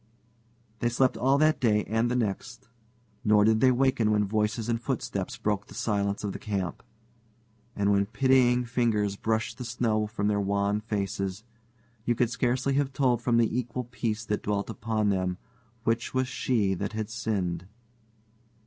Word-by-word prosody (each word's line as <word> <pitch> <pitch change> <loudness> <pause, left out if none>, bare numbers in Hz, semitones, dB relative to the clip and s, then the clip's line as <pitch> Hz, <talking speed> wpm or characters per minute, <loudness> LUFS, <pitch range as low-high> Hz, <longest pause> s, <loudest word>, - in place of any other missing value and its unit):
They 120 - +1
slept 130 +2 +2
all 135 +2 +3
that 155 +1 +3
day 105 -4 +3
and 115 +2 0
the 125 - 0
next, 120 +1 -3 0.6
nor 105 -1 +5
did 110 0 +4
they 130 - +5
waken 125 -3 +2
when 105 -1 +2
voices 105 +2 -1
and 115 -1 0
footsteps 120 -3 -3
broke 105 -3 -1
the - - -12
silence 100 -3 -1
of 100 - -2
the - - -6
camp. 95 -5 -3 0.9
And 100 0 +2
when 100 0 +2
pitying 125 +1 +3
fingers 115 -4 +1
brushed 110 +4 -2
the - - -4
snow 115 -3 0
from 105 -1 -2
their 105 -1 +1
wan 100 +1 0
faces, 100 -2 -3 0.6
you 120 +1 +1
could 120 0 +1
scarcely 130 +2 0
have 140 0 +1
told 125 -4 +2
from 120 -1 +2
the 115 -1 +2
equal 125 0 -2
peace 115 -2 -3
that 105 - -1
dwelt 100 +1 -2
upon 110 -2 -1
them 95 -2 0 0.5
which 115 +2 -1
was 130 0 +1
she 115 -6 0
that 100 +4 -3
had 110 -1 -3
sinned. 90 -7 -2
110 Hz, 165 wpm, -28 LUFS, 100-125 Hz, 0.9 s, nor